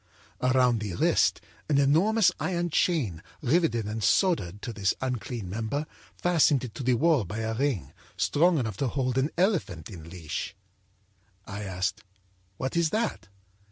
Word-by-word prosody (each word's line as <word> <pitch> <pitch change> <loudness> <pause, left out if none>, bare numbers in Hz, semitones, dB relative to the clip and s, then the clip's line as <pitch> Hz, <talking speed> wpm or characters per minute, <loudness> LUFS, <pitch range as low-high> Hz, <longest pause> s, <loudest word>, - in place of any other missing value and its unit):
âAround 125 -2 +3
the 105 -5 -4
wrist, - - +2 0.3
an 145 - +3
enormous 180 +9 +4
iron 175 -2 -1
chain, 130 - +1 0.2
riveted 140 - +2
and 105 +1 -4
soldered 105 - +2
to 115 - -6
this 100 -3 0
unclean 125 -4 -3
member, 110 +10 -2 0.3
fastened 160 -6 +3
it 120 -4 -6
to - - -7
the 125 -1 +2
wall 150 -1 +3
by 100 +4 -6
a 110 0 -2
ring, 115 - -1 0.2
strong 145 - +3
enough 110 -8 -2
to 135 - 0
hold 130 0 -1
an 135 +3 +1
elephant 150 - 0
in 85 -4 -10
leash. 85 +1 -5 0.9
âI 100 +1 -5
asked: 95 +3 -2 0.6
â'What 130 +5 -2
is 170 -2 +3
that?' 225 +4 -2
125 Hz, 155 wpm, -27 LUFS, 100-155 Hz, 0.9 s, enormous